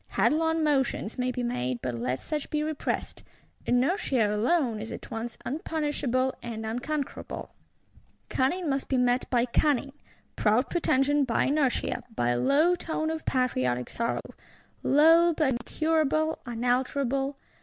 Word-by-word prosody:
Headlong 320 +1 +2
motions 270 -6 0
may 250 0 +1
be 250 0 -3
made, 125 - -2
but 125 -1 -2
let 125 +2 -2
such 300 -2 -4
be 300 0 0
repressed; 310 -1 -3 0.5
inertia 245 - +2
alone 240 0 +1
is 220 +1 -6
at - - -8
once 225 +1 -5
unpunishable 280 -3 -1
and 225 -2 -5
unconquerable. 260 +6 -4 0.7
Cunning 335 +7 0
must 275 -1 -1
be 265 - +2
met 250 +1 +1
by 240 -1 +2
cunning; 275 +2 +1 0.4
proud 220 +6 +2
pretension 290 -3 +2
by 240 -4 +1
inertia, 280 -2 +1
by 120 - +1
a 120 0 +1
low 300 - +4
tone 320 -2 -2
of 320 0 -5
patriotic 130 - 0
sorrow; 235 0 -1 0.6
low, 330 +4 +5
but 305 -3 +2
incurable, 315 +4 0
unalterable. 260 +3 0
265 Hz, 135 wpm, -27 LUFS, 235-305 Hz, 0.7 s, low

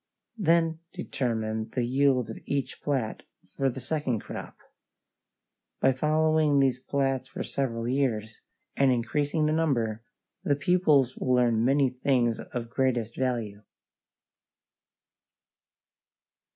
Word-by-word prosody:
Then 165 -3 +2
determine 110 - -2
the 125 -2 +1
yield 130 -2 +2
of - - -8
each 140 -1 -3
plat 130 -7 -2 0.2
for 135 +9 -1
the 130 - -6
second 130 -4 -2
crop. - - -8 1.2
By 135 - +4
following 155 +1 +2
these 130 -2 +2
plats 135 -1 -1
for - - -5
several 115 -4 -2
years, 115 -5 -1 0.3
and 135 -1 +4
increasing 145 +6 0
the 155 - +2
number, 120 -9 0 0.4
the 145 - +2
pupils 145 -5 +3
will 130 -1 +1
learn 120 -2 +3
many 135 +1 +3
things 125 -3 +1
of 115 -1 -6
greatest 120 -4 0
value. 115 -6 -2
130 Hz, 110 wpm, -27 LUFS, 120-145 Hz, 1.2 s, By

